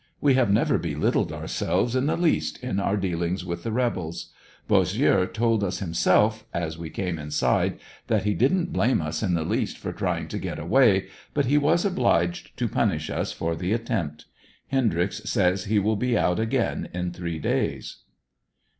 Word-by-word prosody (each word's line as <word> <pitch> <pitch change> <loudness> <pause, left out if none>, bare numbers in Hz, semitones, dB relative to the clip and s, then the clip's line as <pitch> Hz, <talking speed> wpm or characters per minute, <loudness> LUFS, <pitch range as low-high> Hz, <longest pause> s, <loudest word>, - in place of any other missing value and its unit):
We 140 -2 +4
have 130 -4 +3
never 100 - +3
belittled - - 0
ourselves 95 +9 -1
in 130 +2 +1
the - - +1
least 170 -2 +1
in 110 -6 -1
our 100 +1 0
dealings 90 -1 -2
with 85 -1 -4
the 115 - -3
rebels. 110 -9 -2 0.3
Bossieux 95 -2 +3
told 115 -2 +1
us 90 -2 -1
himself, 100 +5 +2
as 80 -2 -2
we 80 -1 -7
came 90 -1 -3
inside, 75 0 0 0.3
that - - +1
he 105 - +1
didn't 170 - +1
blame 125 +3 +2
us 80 0 -3
in 90 -5 +1
the 80 - 0
least - - -1
for - - -5
trying - - -2
to - - -4
get - - -4
away, 100 - +3 0.3
but 145 -1 +2
he 145 +4 +3
was 165 +5 +2
obliged 85 - 0
to - - 0
punish - - 0
us - - -2
for 80 0 -2
the 90 +5 -1
attempt. 95 - -3 0.4
Hendryx 110 -7 0
says 95 -3 +1
that - - -8
he 110 - +3
will 105 +2 +2
be 120 +2 +1
out 90 0 +1
again 115 +2 -1
in 90 0 -2
three 85 -2 -4
days. 80 - -2
100 Hz, 180 wpm, -25 LUFS, 85-120 Hz, 0.4 s, We